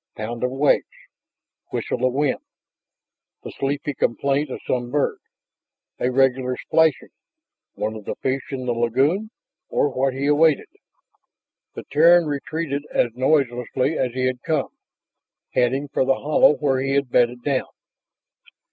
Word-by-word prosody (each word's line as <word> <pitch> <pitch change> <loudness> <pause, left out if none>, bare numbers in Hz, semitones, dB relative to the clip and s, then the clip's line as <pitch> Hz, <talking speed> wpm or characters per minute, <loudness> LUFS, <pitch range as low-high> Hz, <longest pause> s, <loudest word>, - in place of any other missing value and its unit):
Pound 115 +3 -5
of 125 - +2
waves, 135 +3 +2 0.8
whistle - - -3
of 130 -1 +2
wind, 145 +1 0 1.0
the - - -7
sleepy 140 +1 -2
complaint 140 +3 0
of - - -5
some 120 -1 -1
bird.... 145 +2 0 0.8
A 125 - +1
regular 130 -1 +2
splashing! 160 -3 +1 0.6
One 110 +1 -2
of 105 -2 -9
the - - -4
fish 135 +1 -1
in 130 -2 -5
the 125 - 0
lagoon? 135 - +1 0.4
Or 145 - +1
what 130 0 0
he 135 +1 -2
awaited? 150 +1 +3 1.1
The - - -6
Terran 170 +2 +6
retreated 145 0 -3
as 120 - +1
noiselessly 130 0 +1
as 125 -2 -1
he 130 0 -1
had 130 -1 -1
come, 155 -4 -1 0.8
heading 130 +4 +1
for - - +1
the 135 0 +2
hollow 150 +1 +4
where 135 -3 0
he 135 0 -1
had 140 -3 0
bedded 120 0 +2
down. 135 -2 0
135 Hz, 140 wpm, -22 LUFS, 125-145 Hz, 1.1 s, Terran